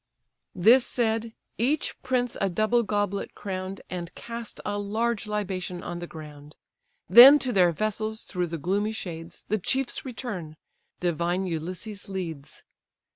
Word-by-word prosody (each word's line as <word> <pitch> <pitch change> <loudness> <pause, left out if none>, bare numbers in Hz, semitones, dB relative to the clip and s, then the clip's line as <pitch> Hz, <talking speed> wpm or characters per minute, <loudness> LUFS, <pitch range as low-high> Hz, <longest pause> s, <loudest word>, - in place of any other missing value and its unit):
This 230 +8 +6
said, 225 -2 0 0.2
each 280 +6 0
prince 245 -2 0
a 195 - +2
double 215 +6 +2
goblet 205 -2 -2
crown'd, 190 0 -5
And 175 -1 -5
cast 235 -1 -7
a 205 0 -1
large 220 +2 -1
libation 185 -4 -3
on 175 0 -5
the 175 - -6
ground; 150 -2 -11 0.5
Then 245 - +11
to 255 -4 -2
their 180 -3 +5
vessels, 215 +4 -2
through 180 -2 -2
the 165 0 -4
gloomy 200 +7 0
shades, 170 -4 -8
The 215 +1 +1
chiefs 265 +7 -1
return; 210 - -6 0.4
divine 175 +2 0
Ulysses 185 +5 -4
leads. 165 -7 -6
200 Hz, 135 wpm, -26 LUFS, 175-225 Hz, 0.5 s, Then